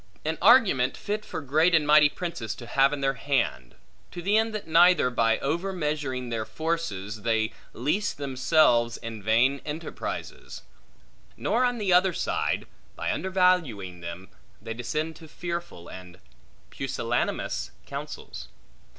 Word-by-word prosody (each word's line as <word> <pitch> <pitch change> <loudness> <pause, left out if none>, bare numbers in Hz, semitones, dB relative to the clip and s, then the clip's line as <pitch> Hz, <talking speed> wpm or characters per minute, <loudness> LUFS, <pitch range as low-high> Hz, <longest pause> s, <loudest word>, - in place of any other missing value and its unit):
An 160 +1 -2
argument 195 - +5
fit 210 +1 -3
for - - -6
great 155 +5 +3
and 155 -2 +3
mighty 150 0 +6
princes 145 - -5
to 120 - -10
have 135 +3 +3
in 145 -1 -3
their 135 0 +2
hand; 125 - -1 0.3
to 175 - -8
the 200 +4 +2
end 225 +1 +3
that 215 - -4
neither 170 -4 +5
by 115 -2 +2
over 170 +8 -1
measuring 150 -7 -2
their 115 -2 -2
forces, 110 - -3
they 110 0 0 0.2
leese 170 - 0
themselves 130 -3 +2
in 115 -2 -7
vain 120 +6 +2
enterprises; 155 +2 -6 0.7
nor 250 - +1
on 245 -1 +1
the 200 -5 +1
other 180 +1 +4
side, - - -1 0.3
by - - -2
undervaluing 175 - +1
them, 85 +2 -8 0.3
they 115 - -6
descend 155 +7 -3
to 160 - -13
fearful 170 - -6
and 90 -2 -11 0.5
pusillanimous - - -2 0.2
counsels. - - -7
145 Hz, 140 wpm, -26 LUFS, 115-175 Hz, 0.7 s, mighty